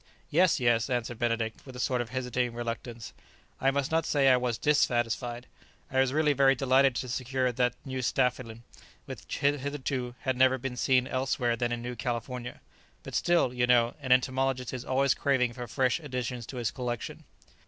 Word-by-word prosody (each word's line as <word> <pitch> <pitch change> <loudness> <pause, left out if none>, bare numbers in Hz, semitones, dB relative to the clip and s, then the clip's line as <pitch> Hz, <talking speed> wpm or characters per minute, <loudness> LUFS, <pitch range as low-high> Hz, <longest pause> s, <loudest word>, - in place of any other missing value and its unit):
"Yes, 175 +1 +4
yes," 120 -1 +2
answered 120 -2 -2
Benedict, 115 -2 -1
with 130 -2 -11
a - - -7
sort 125 0 0
of 120 - -6
hesitating 125 -1 -2
reluctance; 120 -1 -5 0.5
"I 135 - +3
must 140 +1 -1
not 165 0 +2
say 140 -2 +3
I 130 - +7
was 125 -2 -1
dissatisfied; 120 -3 0 0.5
I 130 - +1
was 130 -1 +3
really 150 0 +2
very 135 0 +4
delighted 135 0 +3
to 130 - -3
secure 130 +1 -1
that 125 0 0
new 130 -1 -4
staphylin 120 -2 -1 0.4
which - - -7
hitherto 140 -3 -1
had 130 -2 -1
never 130 0 +4
been 130 0 -5
seen 125 0 +2
elsewhere 130 -2 0
than 120 +1 -1
in 120 0 -3
New 125 0 -4
California; 120 +1 -4 0.4
but - - -9
still, 170 -8 +2
you 125 0 +1
know, 120 -1 +4
an 130 -2 -3
entomologist 130 0 +1
is 125 -1 -5
always 135 +1 +2
craving 130 -4 +1
for 120 0 -7
fresh 130 +3 +1
additions 125 -5 -4
to 130 - -7
his 115 -4 -1
collection." 120 -3 -5
125 Hz, 180 wpm, -29 LUFS, 120-135 Hz, 0.5 s, I